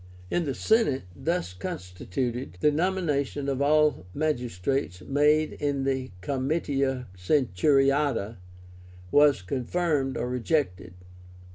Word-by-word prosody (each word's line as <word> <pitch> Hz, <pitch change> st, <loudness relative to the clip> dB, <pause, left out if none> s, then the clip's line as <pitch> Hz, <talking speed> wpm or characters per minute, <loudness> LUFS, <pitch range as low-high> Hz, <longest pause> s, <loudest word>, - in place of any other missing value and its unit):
In 175 Hz, -, +1 dB
the 135 Hz, -3 st, -2 dB
Senate, 220 Hz, -, +2 dB
thus 170 Hz, -, -2 dB
constituted, 90 Hz, +6 st, -4 dB
the 150 Hz, -, +4 dB
nomination 150 Hz, -4 st, -1 dB
of 135 Hz, -1 st, -1 dB
all 150 Hz, -7 st, +3 dB
magistrates 125 Hz, -, -1 dB
made 150 Hz, +6 st, +2 dB
in 140 Hz, -2 st, -1 dB
the 130 Hz, -1 st, -1 dB
Comitia 135 Hz, -, -1 dB
Centuriáta 135 Hz, +2 st, +2 dB, 0.7 s
was 145 Hz, -8 st, +5 dB
confirmed 135 Hz, -, -1 dB
or -, -, -2 dB
rejected. 125 Hz, -, -1 dB
135 Hz, 100 wpm, -27 LUFS, 120-150 Hz, 0.7 s, was